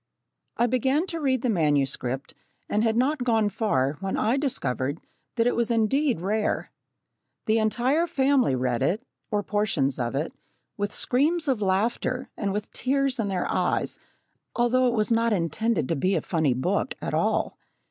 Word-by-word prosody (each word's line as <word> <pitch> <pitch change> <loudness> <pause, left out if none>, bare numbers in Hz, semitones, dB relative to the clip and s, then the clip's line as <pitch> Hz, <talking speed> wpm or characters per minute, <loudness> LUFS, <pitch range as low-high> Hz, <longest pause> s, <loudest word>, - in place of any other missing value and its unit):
I 240 - +3
began 265 +6 +1
to 335 -3 -3
read 260 -5 0
the 250 - +1
manuscript, 140 - 0 0.3
and 210 +1 +1
had 225 0 +1
not 265 +2 +1
gone 225 -4 +2
far 145 - 0
when 195 0 -2
I 225 +4 +2
discovered 145 - -1 0.4
that 230 -1 +2
it 245 - +2
was 235 0 +1
indeed 235 - +1
rare. 210 +3 -1 0.7
The 220 +1 +3
entire 250 +9 +1
family 270 - +2
read 125 -1 -1
it, 190 - 0 0.3
or 205 -1 0
portions 190 -11 0
of 120 +1 -2
it, 150 +4 -2 0.4
with 205 0 -2
screams 310 +6 +1
of 255 -6 +1
laughter, 225 +6 0
and 200 -3 -2
with 210 +1 -4
tears 275 0 0
in 215 - 0
their 190 -2 -1
eyes, - - 0 0.6
although 250 +1 +3
it 240 - +1
was 215 +1 0
not 230 0 +3
intended 190 - 0
to 165 - +1
be 185 +7 +1
a - - +1
funny 160 -7 +1
book 185 - -1
at - - -4
all. - - +1
220 Hz, 170 wpm, -26 LUFS, 170-255 Hz, 0.7 s, I